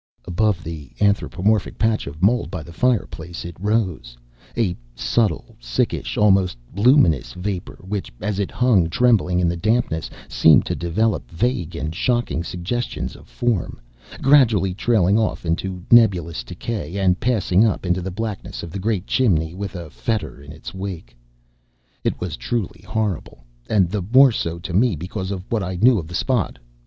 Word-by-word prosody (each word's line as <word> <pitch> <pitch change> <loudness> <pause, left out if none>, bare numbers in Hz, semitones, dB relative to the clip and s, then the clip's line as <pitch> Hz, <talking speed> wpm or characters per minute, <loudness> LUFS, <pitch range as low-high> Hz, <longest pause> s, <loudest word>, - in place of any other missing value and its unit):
Above 90 0 0
the 80 -4 -7
anthropomorphic 100 0 +1
patch 110 -5 +1
of 75 +5 -7
mold 115 +4 +3
by 90 -5 -5
the 85 - -12
fireplace 90 -8 -1
it 85 -1 -7
rose; 95 - -1 0.4
a 100 -7 +1 0.2
subtle, 80 - 0
sickish, - - -2
almost 95 -7 +3 0.2
luminous 100 - +4
vapor 90 0 -5
which 100 -1 -3
as 100 0 -2
it 100 - -1
hung 110 -10 +3
trembling 100 -4 +3
in 90 - +2
the 85 - 0
dampness 105 -4 0 0.2
seemed 80 -2 +5
to - - -2
develop 85 - -1
vague 90 - -1
and 80 -1 -3
shocking 120 -3 0
suggestions 90 +8 -4
of - - -15
form, 120 - -2 0.4
gradually 115 -9 +4
trailing 105 -1 +2
off 110 -4 -1
into 90 +2 -2
nebulous 90 - +4
decay 100 - -5
and 95 -2 +2
passing 110 -5 +2
up 110 -4 0
into 90 +1 +1
the 95 - -4
blackness 105 +2 -5
of 85 - -7
the 100 - -5
great 100 -2 -1
chimney 85 -12 +1
with 100 +1 -6
a 85 -4 -7
fetor 110 -10 -3
in 70 +1 -11
its 80 - -9
wake. 95 -10 -6 0.9
It - - -1
was 90 -2 -4
truly 115 -6 -3
horrible, 105 - -3 0.3
and 100 -5 +3
the 100 +3 -2
more 130 +8 +6
so 85 -6 -2
to 85 +1 -7
me 110 +2 +3
because 95 +4 -5
of 95 -2 -4
what 115 -2 +1
I 95 -1 -3
knew 115 +4 +4
of 80 - -7
the 90 - -7
spot. 125 - 0
95 Hz, 165 wpm, -21 LUFS, 85-110 Hz, 0.9 s, more